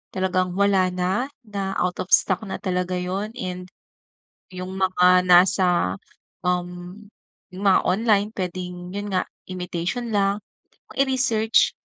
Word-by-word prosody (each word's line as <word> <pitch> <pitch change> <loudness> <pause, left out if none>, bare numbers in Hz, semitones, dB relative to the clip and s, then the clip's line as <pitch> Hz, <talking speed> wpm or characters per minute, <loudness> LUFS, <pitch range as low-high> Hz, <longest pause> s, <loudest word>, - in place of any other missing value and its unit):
talagang 185 -1 0
wala 195 -1 +3
na, 185 +8 -1 0.2
na 200 -3 -4
out 180 0 -1
of - - -16
stock 185 -2 0
na - - -4
talaga 180 -1 -2
yun 185 +4 -3
and 180 -6 -5 0.8
yung 185 0 -7
mga 185 -1 +4
nasa 180 - +4 0.5
um, 180 +1 -3 0.5
yung 190 +2 -7
mga 185 - +5
online 210 +1 +2
pwedeng 180 -1 -5
yun 205 0 -4
nga 185 - +1 0.2
imitation 180 +5 -3
lang 200 0 +1 0.6
i-research 255 -5 +2
185 Hz, 120 wpm, -23 LUFS, 180-200 Hz, 0.8 s, mga